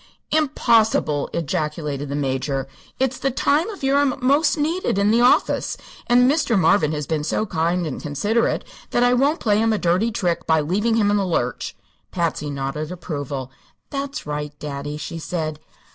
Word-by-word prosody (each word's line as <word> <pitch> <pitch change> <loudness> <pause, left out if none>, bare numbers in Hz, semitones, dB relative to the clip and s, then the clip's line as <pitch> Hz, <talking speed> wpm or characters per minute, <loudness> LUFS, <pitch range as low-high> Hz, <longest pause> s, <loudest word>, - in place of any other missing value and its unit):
"Impossible!" 230 - +2
ejaculated 150 -2 -2
the 140 - -2
Major. 135 -1 -1 0.3
"It's 265 0 0
the 270 - +1
time 290 - +1
of 400 -9 -9
year 270 +1 +3
I'm 285 -2 +2
most 280 +6 +3
needed 315 - 0
in 200 +1 +3
the 235 +2 +4
office, 245 - +3 0.3
and 245 +1 +5
Mr. 280 -5 +2
Marvin 165 -3 +3
has 150 -1 -3
been 155 0 -1
so 190 +7 0
kind 170 -1 0
and 150 - -5
considerate 205 +11 0 0.3
that 240 - +2
I 245 0 +4
won't 280 +6 +2
play 210 -2 +2
him 225 0 +2
a 215 - +1
dirty 185 +6 +1
trick 170 -5 -1
by 160 -1 +4
leaving 205 +9 +1
him 205 -2 +3
in 205 - +3
the 200 - +1
lurch." 125 -8 -2 0.3
Patsy 165 -4 -2
nodded 140 +3 -4
approval. 145 -7 -5 0.4
"That's 280 0 -4
right, 150 0 -4
daddy," 145 0 -5
she 165 +2 -6
said. 155 -2 -3
175 Hz, 175 wpm, -22 LUFS, 150-245 Hz, 0.4 s, and